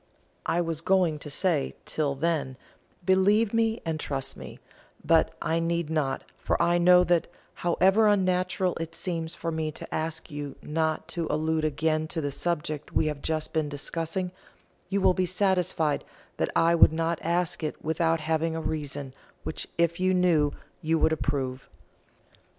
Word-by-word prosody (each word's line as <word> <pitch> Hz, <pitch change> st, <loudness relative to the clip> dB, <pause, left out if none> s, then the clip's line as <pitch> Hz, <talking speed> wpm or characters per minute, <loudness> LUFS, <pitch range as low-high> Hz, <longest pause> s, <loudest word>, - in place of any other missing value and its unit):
I 165 Hz, +2 st, +2 dB
was 165 Hz, -2 st, -2 dB
going 175 Hz, -4 st, +2 dB
to 150 Hz, -, -8 dB
say, 155 Hz, -1 st, 0 dB
Till 145 Hz, -3 st, -1 dB
then, 140 Hz, -4 st, -1 dB, 0.5 s
believe 200 Hz, +4 st, +4 dB
me 225 Hz, 0 st, +1 dB
and 160 Hz, -1 st, -2 dB
trust 135 Hz, -3 st, -3 dB
me; -, -, -9 dB, 0.5 s
but 165 Hz, -1 st, +3 dB
I 165 Hz, +1 st, +1 dB
need 170 Hz, -1 st, -1 dB
not, 145 Hz, -4 st, 0 dB, 0.2 s
for -, -, 0 dB
I 175 Hz, 0 st, +3 dB
know 180 Hz, +1 st, +7 dB
that, 175 Hz, -2 st, +2 dB, 0.3 s
however 190 Hz, +5 st, +4 dB
unnatural 185 Hz, -2 st, +1 dB
it 165 Hz, 0 st, -5 dB
seems 165 Hz, -3 st, -3 dB
for 165 Hz, -, -3 dB
me 160 Hz, -1 st, -2 dB
to -, -, -8 dB
ask 160 Hz, 0 st, -2 dB
you 145 Hz, -1 st, -5 dB
not 160 Hz, 0 st, -1 dB
to 170 Hz, -2 st, -2 dB
allude 155 Hz, +1 st, 0 dB
again 155 Hz, +1 st, 0 dB
to 160 Hz, -, -3 dB
the 145 Hz, -2 st, -2 dB
subject 155 Hz, -1 st, -3 dB
we -, -, +2 dB
have 150 Hz, -2 st, -2 dB
just 155 Hz, -1 st, -2 dB
been 155 Hz, -2 st, 0 dB
discussing, 165 Hz, +5 st, -2 dB, 0.6 s
you 200 Hz, +1 st, 0 dB
will 185 Hz, -, +5 dB
be 185 Hz, 0 st, 0 dB
satisfied 180 Hz, -5 st, +1 dB, 0.3 s
that -, -, 0 dB
I 165 Hz, +1 st, +4 dB
would 165 Hz, -, +7 dB
not 165 Hz, 0 st, 0 dB
ask 170 Hz, +1 st, 0 dB
it 155 Hz, -1 st, -4 dB
without 165 Hz, 0 st, +1 dB
having 160 Hz, +1 st, 0 dB
a -, -, -2 dB
reason 145 Hz, -4 st, -4 dB, 0.3 s
which -, -, -4 dB
if 170 Hz, 0 st, +1 dB
you 185 Hz, 0 st, +2 dB
knew 165 Hz, -5 st, +3 dB, 0.3 s
you 160 Hz, +1 st, +1 dB
would 160 Hz, -, +3 dB
approve. 135 Hz, -4 st, -2 dB
165 Hz, 165 wpm, -27 LUFS, 155-175 Hz, 0.6 s, know